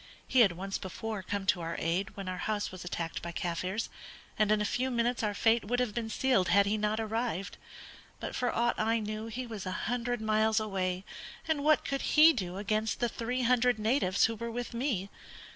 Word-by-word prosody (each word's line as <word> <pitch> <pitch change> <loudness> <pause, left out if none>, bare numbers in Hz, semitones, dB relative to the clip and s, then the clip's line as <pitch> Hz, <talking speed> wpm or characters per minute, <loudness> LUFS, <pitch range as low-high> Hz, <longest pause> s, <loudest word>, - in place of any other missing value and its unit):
He 260 - +3
had 205 -7 +6
once 195 +3 -4
before 210 +2 -5
come 200 +1 -3
to 185 -2 +2
our 165 0 -3
aid 175 +4 -1
when 195 -1 -5
our 185 0 -3
house 210 -1 -1
was 185 -1 -8
attacked 170 -2 -4
by 170 - -5
Kaffirs, 180 +5 -2 0.5
and 215 -1 +2
in 215 - +4
a 210 - 0
few 250 +5 0
minutes 240 0 0
our 210 -2 -1
fate 225 +2 +3
would 245 +4 0
have 245 -4 0
been 230 -1 -3
sealed 230 -5 +2
had 200 +3 +5
he 205 +2 +1
not 210 +1 0
arrived. 225 -2 -2 0.6
But - - -5
for 250 - 0
aught 240 +1 +1
I 225 +1 +2
knew 215 +1 -4
he 250 +3 -4
was 220 -5 -6
a - - -2
hundred 245 0 -1
miles 220 0 +2
away, 190 -3 -2 0.4
and 310 -3 0
what 310 +1 +4
could 275 -1 -1 0.2
he 320 +2 +9
do 185 - -4
against 215 +2 -1
the 240 - +1
three 245 +3 -2
hundred 250 0 +3
natives 215 -3 +2
who 230 - 0
were 235 +1 -5
with 240 +1 -4
me? 235 -6 -1
215 Hz, 210 wpm, -31 LUFS, 195-240 Hz, 0.6 s, he